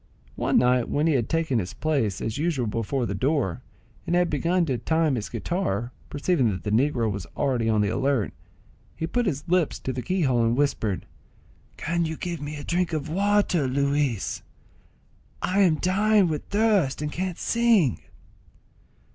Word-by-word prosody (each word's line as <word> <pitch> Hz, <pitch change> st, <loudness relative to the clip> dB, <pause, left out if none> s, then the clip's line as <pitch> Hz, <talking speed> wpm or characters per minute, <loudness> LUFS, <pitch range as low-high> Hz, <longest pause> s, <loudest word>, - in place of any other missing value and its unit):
One -, -, +1 dB
night 125 Hz, -1 st, +3 dB
when 150 Hz, +2 st, +1 dB
he 165 Hz, -, +3 dB
had 120 Hz, -5 st, 0 dB
taken 160 Hz, -7 st, +1 dB
his 90 Hz, -3 st, -5 dB
place 135 Hz, -, 0 dB
as 110 Hz, +4 st, -3 dB
usual 150 Hz, -6 st, 0 dB
before 115 Hz, +4 st, -1 dB
the 100 Hz, -, -3 dB
door, 130 Hz, -, 0 dB, 0.5 s
and 175 Hz, -, +1 dB
had 175 Hz, -1 st, +2 dB
begun 170 Hz, +4 st, +1 dB
to 130 Hz, -6 st, -1 dB
time 160 Hz, +4 st, +1 dB
his 110 Hz, -5 st, -3 dB
guitar, 120 Hz, -, -2 dB, 0.2 s
perceiving 145 Hz, -4 st, +1 dB
that 95 Hz, -3 st, -4 dB
the 105 Hz, -, -2 dB
negro 120 Hz, -1 st, +2 dB
was 100 Hz, -3 st, -5 dB
already 125 Hz, -5 st, +1 dB
on 110 Hz, -1 st, +3 dB
the 100 Hz, -, +1 dB
alert, 135 Hz, -2 st, 0 dB, 0.6 s
he 160 Hz, -, -3 dB
put 240 Hz, +6 st, 0 dB
his 145 Hz, -5 st, -2 dB
lips 175 Hz, -3 st, +1 dB
to 130 Hz, -, -4 dB
the 125 Hz, -, -3 dB
key 185 Hz, +5 st, 0 dB
hole 125 Hz, -4 st, +2 dB
and 115 Hz, +2 st, +1 dB
whispered, 115 Hz, -9 st, 0 dB, 0.7 s
"Can 170 Hz, +1 st, -1 dB
you 160 Hz, -1 st, -4 dB
give 170 Hz, -4 st, -4 dB
me 145 Hz, +1 st, -5 dB
a 145 Hz, -, -7 dB
drop 175 Hz, 0 st, -1 dB
of 155 Hz, -2 st, -2 dB
water, 195 Hz, -4 st, +2 dB
Luis? 140 Hz, -4 st, 0 dB, 1.0 s
I 185 Hz, +2 st, 0 dB
am 180 Hz, -5 st, +5 dB
dying 200 Hz, +4 st, +3 dB
with 150 Hz, -2 st, -3 dB
thirst, 200 Hz, -10 st, +1 dB
and 150 Hz, -, -3 dB
can't 185 Hz, 0 st, -3 dB
sing." 230 Hz, -, +2 dB
145 Hz, 175 wpm, -25 LUFS, 120-175 Hz, 1.0 s, am